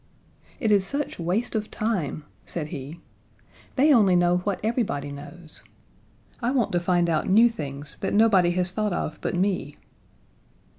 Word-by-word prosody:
"It 220 -4 +1
is 200 -2 +4
such 280 +6 -3
waste 185 +8 -1
of 215 -1 -2
time," 190 -9 -2 0.2
said 155 -3 -4
he. 150 +1 -7 0.7
"They 290 +3 +5
only 200 -7 +5
know 175 0 +3
what 190 +2 -2
everybody 215 - -1
knows. 150 +3 -9 0.8
I 240 - +1
want 250 -5 +1
to 175 - +2
find 175 0 +1
out 160 0 0
new 230 +5 +6
things 145 -5 -4
that - - -1
nobody 205 -5 +5
has 180 0 +1
thought 210 0 -1
of 155 -3 -3
but - - -2
me." 180 -6 -1
180 Hz, 155 wpm, -25 LUFS, 165-220 Hz, 0.8 s, new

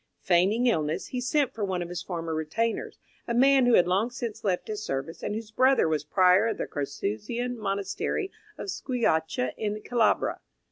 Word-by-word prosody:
Feigning 190 +7 +3
illness, 155 -10 0
he 250 - -3
sent 265 +1 +1
for 220 - -4
one 185 -3 -1
of 170 - -8
his 175 0 -4
former 165 -3 -4
retainers, 160 +9 -2 0.3
a 235 - -1
man 265 0 +5
who 245 - +6
had 175 - +5
long 195 +6 +2
since 235 -3 -6
left 185 -3 0
his 215 -1 -4
service, 135 +2 -4
and 210 - -3
whose 220 -1 -6
brother 260 -2 +4
was 155 -2 0
Prior 185 +6 +4
of 225 - -2
the - - -2
Carthusian 145 - -3
Monastery 205 - -2 0.3
of 200 - -4
Squillace, 160 - 0
in 210 -1 -2
Calabria. 235 -3 +1
205 Hz, 180 wpm, -27 LUFS, 170-240 Hz, 0.3 s, who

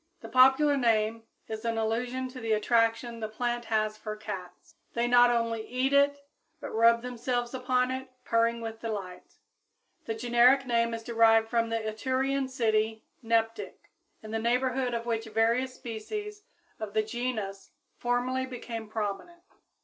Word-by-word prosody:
The - - -9
popular 265 +3 +5
name 225 -2 +1 0.2
is 220 0 -6
in 230 -1 -1
allusion 245 +4 -1
to 255 0 -9
the 225 -2 0
attraction 230 +2 +1
the 220 - -3
plant 240 +2 -2
has 215 -1 0
for 215 -1 -5
cats. 205 -4 -8 0.2
They 235 0 +1
not 245 0 +6
only 230 -2 0
eat 255 +2 0
it, 280 0 +4 0.4
but - - -7
rub 230 +1 +4
themselves 245 0 -2
upon 255 0 +1
it 260 0 -5 0.2
purring 230 0 +1
with 225 -1 -6
delight. 195 -5 -6 0.7
The 225 - -2
generic 245 +3 +4
name 235 -1 +1
is 225 - -7
derived 225 -1 +4
from 230 -1 +1
the 230 - 0
Etrurian 260 +5 -1
city 220 -3 0 0.2
Neptic, 225 -1 -1 0.3
in 215 - -8
the 225 - -1
neighborhood 250 +1 0
of 230 0 -3
which 225 -1 -1
various 230 +4 +1
species 415 - -6 0.4
of 215 -2 -6
the 215 - +3
genus 215 -4 -4 0.3
formerly 250 +2 0
became 230 -3 -7
prominent. 220 - -4
230 Hz, 150 wpm, -29 LUFS, 220-255 Hz, 0.7 s, not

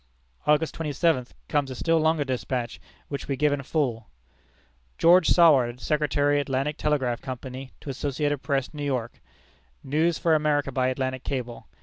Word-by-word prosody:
August 150 +1 +3
twenty 160 -2 -4
seventh, 145 -4 0
comes 145 -2 0
a 130 - -6
still 165 +4 +2
longer 160 -1 +2
despatch, 130 -2 -3 0.3
which 140 - -5
we 140 - -1
give 150 +1 +2
in 145 - -2
full: 125 -7 -2 0.9
"George 175 0 +5
Saward, 135 -8 +5
Secretary 145 0 +1
Atlantic 140 +1 -1
Telegraph 135 -7 0
Company, 130 +1 -7
to 140 - -6
Associated 145 +1 -2
Press, 140 -2 -1
New 145 -1 -5
York. 125 -5 -3 0.6
News 155 +4 +1
for 165 - +2
America 150 -2 +1
by 130 -1 +1
Atlantic 130 0 -2
cable. 125 -3 -5
140 Hz, 150 wpm, -26 LUFS, 130-150 Hz, 0.9 s, George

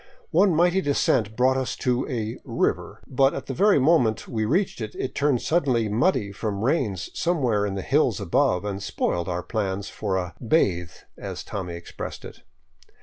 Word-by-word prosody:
One 195 -5 +4
mighty 175 +3 +3
descent 125 - +1
brought 130 +2 +3
us 130 -1 -2
to 125 +2 -1
a 115 -4 -3
" - - -40
river," - - -2
but 135 +1 +2
at 135 - -5
the 135 - -4
very 200 +5 +4
moment 130 -6 +3
we 110 -2 -1
reached 170 - 0
it, 110 -1 -5
it 130 - -4
turned 140 -4 +1
suddenly 130 -9 +1
muddy 110 - +1
from 100 0 -3
rains 115 - 0
somewhere 125 -12 +1
in 100 - -3
the 95 - -4
hills - - +2
above 90 +2 +1
and 100 -1 -3
spoiled 85 -2 -1
our 90 0 -2
plan 100 -3 -2
for 100 -1 -3
a 90 -1 -3
" - - -25
bathe," 90 - +1 0.3
as - - -6
Tommy 90 -4 -5
expressed 85 - -7
it. - - -11
115 Hz, 185 wpm, -25 LUFS, 100-140 Hz, 0.3 s, One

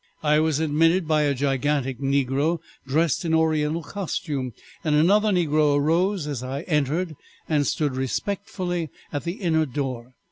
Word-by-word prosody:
I 150 0 +4
was 155 -2 +1
admitted 165 +3 +2
by 155 -1 +3
a 145 -2 +1
gigantic 135 -1 0
negro 140 +4 +1 0.3
dressed 155 +4 +1
in 165 -1 +1
oriental 160 0 +1
costume, 145 -7 -3 0.3
and 150 -2 +2
another 200 +8 +4
negro 155 -6 +3
arose 170 +4 +1
as 145 -5 -4
I 130 +2 -4
entered, 155 +2 0 0.3
and 145 -3 +1
stood 145 -2 0
respectfully 175 +4 -2 0.2
at 145 - -3
the 170 - -1
inner 160 -6 +1
door. 130 -2 -4
150 Hz, 145 wpm, -24 LUFS, 140-165 Hz, 0.3 s, I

